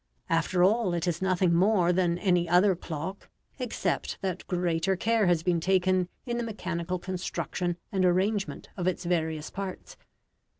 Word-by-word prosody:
After 165 +2 +2
all, 195 -2 +3
it 170 +1 -2
is 175 0 -1
nothing 185 -2 +2
more 180 0 +3
than 175 -1 +1
any 175 -2 +1
other 180 +2 +5
clock, 170 +3 -6 0.3
except 225 -7 -2
that 185 -1 -3
greater 175 +1 0
care 220 +1 +2
has 170 -2 +2
been 175 -1 +2
taken 185 0 +2 0.2
in 240 -2 -2
the 240 - -1
mechanical 185 -5 -3
construction 175 -1 -3
and 190 -2 +1
arrangement 195 +3 0
of 180 -2 -2
its 180 -1 -1
various 160 -3 -1
parts. 195 - -6
180 Hz, 155 wpm, -28 LUFS, 170-190 Hz, 0.3 s, other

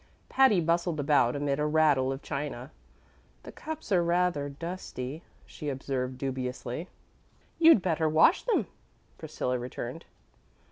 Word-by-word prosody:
Patty 265 -8 +4
bustled 170 0 0
about 140 -4 +3
amid 145 0 -1
a 150 - +1
rattle 150 -4 +3
of 135 +1 -6
china. 140 -2 -5 0.7
"The - - -9
cups 315 -7 -8
are 180 -3 +4
rather 170 -4 +1
dusty," 155 -2 -6 0.2
she 150 - -6
observed 130 -1 -3
dubiously. 130 +3 -4 0.7
"You'd 325 - +7
better 160 -3 +1
wash 155 +1 +5
them," - - +1 0.5
Priscilla 125 0 -3
returned. 125 +4 -6
150 Hz, 125 wpm, -28 LUFS, 130-170 Hz, 0.7 s, You'd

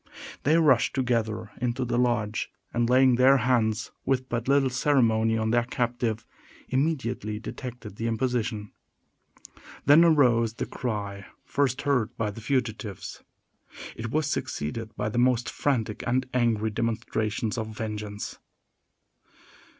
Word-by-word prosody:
They 155 +4 +3
rushed 140 -7 +4
together 115 -4 -1
into 125 +1 -1
the 120 0 0
lodge, 115 -4 0 0.2
and, 120 0 +1
laying 130 -1 +5
their 130 +2 +6
hands, 115 -3 +1
with 130 -1 0
but 120 0 -2
little 135 -1 +3
ceremony, 115 -4 +2
on 110 0 0
their 120 0 +2
captive, 120 -2 -2 0.4
immediately 130 -7 -1
detected 115 -2 -8
the 115 - -2
imposition. 115 -3 -1 1.1
Then 145 +5 +7
arose 120 -9 +4
the - - -3
cry 100 -5 -4 0.2
first 135 -3 0
heard 125 -6 0
by 110 -2 -1
the 115 - -10
fugitives. 115 -5 -3 0.7
It 115 0 -5
was 155 +5 0
succeeded 115 - -3
by 105 0 -2
the 120 - -1
most 125 -1 +2
frantic 115 -7 -1
and 125 +1 +1
angry 115 -3 +1
demonstrations 110 0 -2
of 110 -2 -3
vengeance. 105 -1 -5
120 Hz, 125 wpm, -27 LUFS, 110-130 Hz, 1.1 s, Then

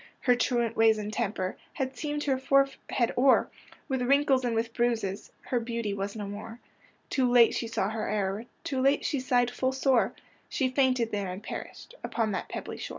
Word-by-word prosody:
Her 250 - +4
truant 240 -2 0
ways 225 -1 +5
and 210 0 -4
temper 195 -5 -2 0.2
Had 260 0 -3
seamed 295 +1 -3
her 265 -2 +1
forehead 275 -2 +1
o'er 265 +1 +4 0.4
With 265 -3 -1
wrinkles 275 +1 +3
and 240 -2 0
with 230 0 -1
bruises,— 225 -5 -1
Her 245 - -1
beauty 230 -3 -3
was 200 +1 -4
no 210 -2 -4
more. 210 +3 -7 0.5
Too 255 -2 +2
late 240 -2 +6
she 230 - -2
saw 225 -4 -1
her 220 -1 -3
error. 205 +1 -1 0.2
Too 265 -2 -2
late 275 +2 +3
she 285 - 0
sighed 245 -1 +2
full 260 +1 0
sore; 260 -6 +2 0.3
She 260 -2 0
fainted 255 -3 +2
there, 205 -2 -2
and 185 +3 -6
perished 470 - -8
Upon 225 -3 -1
that 195 - -3
pebbly - - -6
shore. - - -6
240 Hz, 190 wpm, -28 LUFS, 215-260 Hz, 0.5 s, late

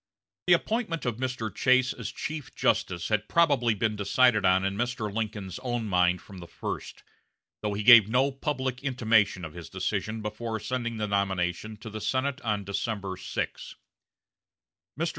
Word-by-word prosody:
The - - +7
appointment 215 - 0
of 120 -3 -1
Mr. 125 -5 -3
Chase 130 +3 +3
as 115 - -6
chief 150 -3 -6
justice 85 -1 0
had 105 -1 0
probably 140 -9 +3
been 110 +1 0
decided 105 +2 +3
on 95 +1 +3
in 95 0 -1
Mr. 115 -2 -2
Lincoln's 105 -4 -4
own 120 -3 -2
mind 90 -2 +2
from 95 -2 -11
the 85 - -9
first, - - -6 0.6
though 105 -1 -2
he 105 - -2
gave 115 -2 +9
no 130 +4 +3
public 130 -2 -3
intimation 110 -8 +2
of 80 - -9
his 85 -4 -9
decision 110 0 -3
before 110 +1 -4
sending 115 0 -3
the 105 - -1
nomination 100 +1 -1
to 110 +1 -9
the 110 0 -6
Senate 135 +4 -1
on 105 -3 -1
December 100 -1 -3
6. 90 - -5 1.2
Mr. - - +1
110 Hz, 160 wpm, -28 LUFS, 100-125 Hz, 1.2 s, gave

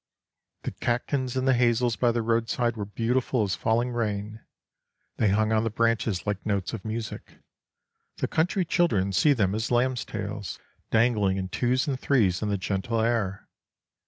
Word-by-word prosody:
The - - -3
catkins 130 +1 -1
in 130 - 0
the 135 - +4
hazels 120 -1 +2
by 120 +3 +2
the 115 0 -1
roadside 115 +1 0
were 105 -2 -4
beautiful 120 +2 0
as 100 -2 -1
falling 115 +6 0
rain: 110 -2 -3 0.7
they 105 - +3
hung 110 +2 +2
on 110 0 +2
the 115 - 0
branches 115 -3 0
like 100 -2 -2
notes 100 -2 -1
of 110 - -5
music. 110 0 -6 0.8
The - - -1
country 180 +3 +1
children 105 - +1
see 145 +8 +4
them 100 -7 +1
as 110 +2 -2
lambs' 125 +1 +1
tails, 105 -2 -5 0.3
dangling 110 -4 +2
in 95 -1 -3
twos 125 +5 0
and 135 -3 -1
threes 105 -12 +2
in 105 - -1
the 100 - 0
gentle 100 +4 -2
air. 110 -4 0
115 Hz, 165 wpm, -26 LUFS, 105-120 Hz, 0.8 s, the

